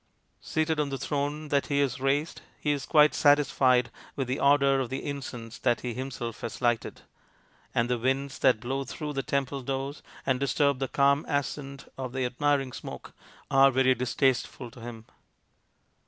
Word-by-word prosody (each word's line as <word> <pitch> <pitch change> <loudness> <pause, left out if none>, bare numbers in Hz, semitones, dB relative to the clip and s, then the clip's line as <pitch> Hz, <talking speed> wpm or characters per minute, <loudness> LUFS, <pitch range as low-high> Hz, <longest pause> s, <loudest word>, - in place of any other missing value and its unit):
Seated 155 0 0
on 150 -1 0
the 135 - -3
throne 145 +2 -2
that 140 -1 +1
he 140 -1 +1
has 135 -4 0
raised, 140 +4 0 0.2
he 150 - 0
is 140 -2 -2
quite 150 -1 +6
satisfied 130 -4 +4 0.2
with 135 -2 -2
the 130 - -2
odour 140 -1 +4
of 130 -3 -2
the 135 - -4
incense 125 -5 -6
that 120 -2 +1
he 125 -1 -3
himself 125 -2 -5
has 115 - -5
lighted, 120 -2 0 0.7
and 115 - +2
the 125 -1 0
winds 135 +3 -1
that 130 -4 +4
blow 135 +4 -2
through 150 +4 -5
the 135 - -1
temple 140 0 -2
doors 135 +2 -4 0.2
and 130 -2 +1
disturb 140 0 +1
the 135 - -1
calm 140 +2 +3
ascent 140 -1 -3
of 130 -2 -4
the 130 -1 -1
admiring 135 +1 0
smoke - - -8 0.4
are 135 0 +7
very 130 0 +3
distasteful 125 0 0
to 120 - -13
him. 115 -1 -8
135 Hz, 170 wpm, -28 LUFS, 125-140 Hz, 0.7 s, are